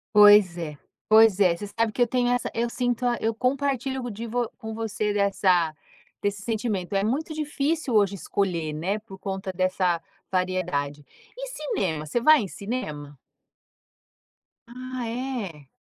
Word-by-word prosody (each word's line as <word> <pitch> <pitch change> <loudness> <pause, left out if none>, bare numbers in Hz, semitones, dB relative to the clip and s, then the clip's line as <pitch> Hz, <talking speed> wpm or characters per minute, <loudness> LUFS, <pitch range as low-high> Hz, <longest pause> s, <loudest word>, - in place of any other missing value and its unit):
Pois 205 -4 +8
é. 155 -4 -5 0.3
Pois 220 -2 +6
é, 180 -4 +5
você 205 +4 -7
sabe 230 +2 0
que 245 - -3
eu 240 - +5
tenho 245 0 +1
essa 245 -1 0
eu 235 +1 0
sinto 245 0 -1
a 240 -1 +2
eu 225 +1 +1
compartilho 265 +1 -1
co 245 - -4
de 230 +2 -6
vo 240 0 -1
com 220 -3 -6
você 215 -2 -2
dessa 190 -5 +2 0.5
desse 205 0 -1
sentimento. 215 -4 -2
É 195 - +2
muito 280 +9 -1
difícil 300 -2 -1
hoje 200 -2 +3
escolher, 175 -5 -1
né, 185 +8 -2
por 200 -3 -12
conta 190 0 -4
dessa 185 -2 +1 0.3
variedade. 180 -6 -1 0.3
E - - -5
cinema, 190 - -2
você 155 +10 0
vai 310 +2 +7
em 205 - -3
cinema? 150 - -5 1.5
Ah, 255 0 -6
é? 225 - -4
210 Hz, 155 wpm, -25 LUFS, 185-245 Hz, 1.5 s, Pois